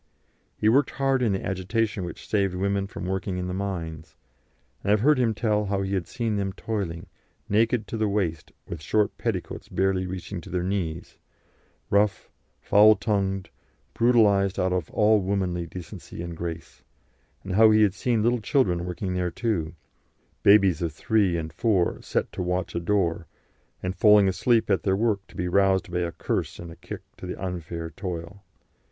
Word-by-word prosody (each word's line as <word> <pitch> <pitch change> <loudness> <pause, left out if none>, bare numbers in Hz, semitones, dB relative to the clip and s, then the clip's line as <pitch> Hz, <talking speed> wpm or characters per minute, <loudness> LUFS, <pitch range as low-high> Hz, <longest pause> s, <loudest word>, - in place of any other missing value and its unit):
He 105 - +1
worked 130 +5 +4
hard 135 -1 0
in 115 -4 +2
the 95 - -3
agitation 100 +2 -1
which 85 -2 -8
saved 100 -3 +1
women 100 +1 0
from 95 - -7
working 95 0 -2
in 90 - -3
the 90 - -3
mines, 85 -5 -5 0.7
and 100 - -3
I - - +6
have 105 - +2
heard 145 +2 +4
him 115 -3 +2
tell 105 -1 +1
how 100 0 -1
he 95 +1 -3
had 95 -3 -1
seen 115 -4 -2
them 95 -1 -2
toiling, 95 -8 -4 0.4
naked 110 +2 +2
to 115 - -3
the 110 -1 +1
waist, 90 -6 -2 0.2
with 85 -3 -6
short 105 +7 +1
petticoats - - -3
barely 95 0 0
reaching 90 0 -6
to - - -12
their 90 0 -1
knees, 90 -4 -3 0.7
rough, 100 -2 +1 0.3
foul 105 +1 +6
tongued, 95 -2 -1 0.4
brutalised 105 -5 +3
out 90 0 +1
of 90 -5 -2
all 105 -1 +3
womanly 90 -3 -1
decency 85 0 -8
and 85 -1 -6
grace; 85 -1 -7 0.6
and 95 - -4
how 110 +3 +7
he 110 0 +5
had 100 -3 +3
seen 115 0 0
little 120 0 +2
children 90 -9 +1
working 90 +1 -3
there 90 -1 0
too, 85 -5 -2 0.7
babies 100 -5 +5
of 85 -2 -1
three 95 +2 +1
and 80 -1 -5
four 100 -7 +1
set - - -2
to - - -5
watch 90 0 -2
a - - -1
door, 85 -2 0 0.6
and 90 +1 -2
falling 105 -1 +6
asleep 105 +4 +2
at 95 - +2
their 95 -1 +1
work 110 -2 +1
to - - -18
be 90 - -1
roused 95 0 +2
by 90 -1 -1
curse - - -2
and 85 -1 -10
kick - - -7 0.2
to - - -8
the - - -6
unfair 85 -3 -5
toil. 90 +1 -6
95 Hz, 180 wpm, -25 LUFS, 90-105 Hz, 0.7 s, how